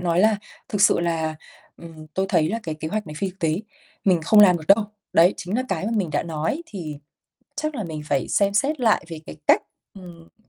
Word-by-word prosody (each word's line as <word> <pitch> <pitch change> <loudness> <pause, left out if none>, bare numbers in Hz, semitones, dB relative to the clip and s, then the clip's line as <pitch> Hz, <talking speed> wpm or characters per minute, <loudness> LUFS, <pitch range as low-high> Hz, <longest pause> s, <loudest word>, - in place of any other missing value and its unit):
nói 175 0 +1
là 215 +1 +4 0.3
"Thực 205 - -2
sự 205 - +5
là, 160 -2 -1 0.4
ừm, 160 -2 -12
tôi 190 0 0
thấy 160 -3 +2
là 230 +5 -2
cái 160 - -4
kế 155 +1 -5
hoạch 210 +2 -3
này 150 - -8
phi 195 - -1
thực 185 - -23
tế, 160 -4 +1 0.5
mình 185 -4 +3
không 210 +6 +6
làm 180 -4 +7
được 155 - -9
đâu." 205 +2 +6 0.3
Đấy 175 +3 +5
chính 185 +6 -3
là 255 - +1
cái 190 +1 -2
mà 225 - -1
mình 185 -6 0
đã 145 - 0
nói, 165 - -3
thì 165 - -7 0.6
chắc 305 0 -2
là 220 -7 -3
mình 155 -2 -6
phải 140 -3 -1
xem 200 0 +2
xét 280 +6 +1
lại 225 -3 +3
về 165 -2 -7
cái - - -9
cách, - - +5 0.3
ừm 180 +2 -15
180 Hz, 235 wpm, -23 LUFS, 160-210 Hz, 0.6 s, làm